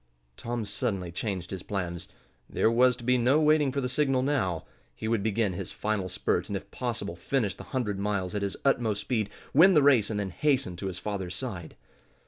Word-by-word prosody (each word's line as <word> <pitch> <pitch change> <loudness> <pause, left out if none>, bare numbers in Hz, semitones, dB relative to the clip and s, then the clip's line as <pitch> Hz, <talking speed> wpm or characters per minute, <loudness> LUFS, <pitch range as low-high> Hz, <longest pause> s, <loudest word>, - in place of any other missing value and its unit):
Tom 120 - -3
suddenly 95 -3 -2
changed 90 -1 -4
his 95 -2 -4
plans. 90 -3 -4 0.4
There 110 - +2
was 125 +1 +4
to 120 - -12
be 125 +1 +3
no 130 +5 +4
waiting 150 -2 +4
for 140 +1 -1
the 125 - -1
signal 135 -1 +1
now. 100 - 0 0.3
He 110 - -5
would 115 -2 +1
begin 110 -1 0
his 85 - -5
final 105 -3 -2
spurt, 90 -1 -1
and 100 -1 -2
if 100 +1 -12
possible 115 -7 -3
finish 100 +3 -1
the - - -11
hundred 105 -7 -2
miles 100 -2 -1
at 105 - -1
his 100 -1 -2
utmost 115 -7 +2
speed, 110 -1 -1 0.2
win 180 +6 +7
the 150 - +6
race 130 -7 +5
and 105 -2 -2
then 100 -2 -3
hasten 135 - +1
to 95 - -4
his 90 -2 -4
father's 95 -2 -4
side. 95 -11 -5
105 Hz, 205 wpm, -28 LUFS, 95-125 Hz, 0.4 s, win